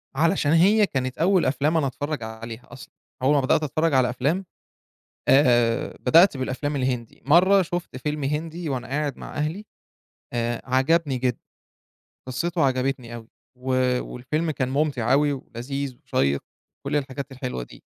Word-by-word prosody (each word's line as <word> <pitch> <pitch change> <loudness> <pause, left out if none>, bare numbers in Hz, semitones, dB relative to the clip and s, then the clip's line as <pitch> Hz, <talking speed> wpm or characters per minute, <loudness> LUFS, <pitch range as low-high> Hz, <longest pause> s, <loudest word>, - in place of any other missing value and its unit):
علشان 160 0 +2
هي 200 +6 +5
كانت 130 -7 -3
أول 185 +2 +3
أفلام 145 +5 +1
أنا 150 -4 +2
أتفرّج 145 0 -4
عليها 115 +1 -8
أصلًا. 125 - -12 0.3
أول 135 +3 +3
ما 140 - +3
بدأت 135 +4 +2
أتفرّج 155 +2 0
على 130 -2 +4
أفلام، 145 +10 -1 0.8
آآ 120 -4 +3
بدأت 165 +4 +5
بالأفلام 130 +3 -2
الهندي. 125 -4 -2
مرّة 185 +7 +6
شُفت 175 -5 -4
فيلم 150 +2 -3
هندي 160 +4 -3
وأنا 130 -2 -3
قاعد 145 +1 -2
مع - - -9
أهلي، 155 +7 -3 0.7
آآ 120 -1 -1
عجبني 135 +2 +2
جدًا، 125 -1 0 0.9
قِصّته 165 +6 -1
عجبتني 130 -2 -1
أوي 115 -1 -10 0.3
و 130 +1 -3 0.3
والفيلم 155 +6 -2
كان 130 -3 -2
مُمتِع 135 -4 +1
أوي 145 +1 +3
ولذيذ 135 +1 -5
وشيّق، 70 +1 +1 0.4
كل - - -1
الحاجات 140 -1 -3
الحلوة 125 - -4
دي. - - -14
135 Hz, 145 wpm, -24 LUFS, 125-155 Hz, 0.9 s, مرّة